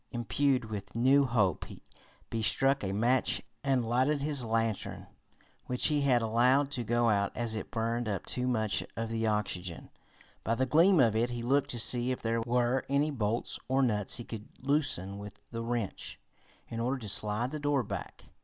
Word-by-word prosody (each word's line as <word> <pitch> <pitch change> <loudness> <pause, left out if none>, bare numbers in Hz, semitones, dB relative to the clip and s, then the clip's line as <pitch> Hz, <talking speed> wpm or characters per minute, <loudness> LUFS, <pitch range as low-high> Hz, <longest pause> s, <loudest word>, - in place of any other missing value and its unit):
Imbued 125 +3 0
with 100 -2 -7
new 135 +4 +4
hope 105 - +1
he 115 - -10
struck 135 +5 +3
a 95 - -2
match 120 +6 +2 0.2
and 135 -4 +1
lighted 130 +5 +1
his 145 -3 0
lantern, 115 -2 -2 0.6
which 125 +4 +3
he 150 -1 +1
had 125 -4 +3
allowed 125 +5 +3
to 125 -4 -1
go 120 0 +2
out 100 -1 +1
as 120 -2 0
it 110 - -4
burned 115 0 -2
up 100 -3 -3
too 125 0 -1
much 110 -5 0
of 115 0 -3
the 115 0 -1
oxygen. 95 -5 -3 0.5
By 115 - 0
the 130 +3 +1
gleam 165 +7 +4
of 115 -5 +4
it 115 +2 +1
he 120 -1 -4
looked 135 +3 +1
to 120 - -2
see 120 +2 +2
if 130 - -3
there 115 0 -1
were 120 +2 +1
any 145 +2 +1
bolts 115 -3 -2
or 135 +1 +2
nuts 105 -5 0
he 120 - -5
could 110 -2 -8
loosen 125 - 0
with 100 0 -9
the 115 -1 -4
wrench, 115 -3 -4 0.5
in 115 - -6
order 125 +4 0
to 115 -5 -7
slide 105 +5 +1
the 155 - -4
door 145 -2 +1
back. - - -7
120 Hz, 185 wpm, -30 LUFS, 110-130 Hz, 0.6 s, new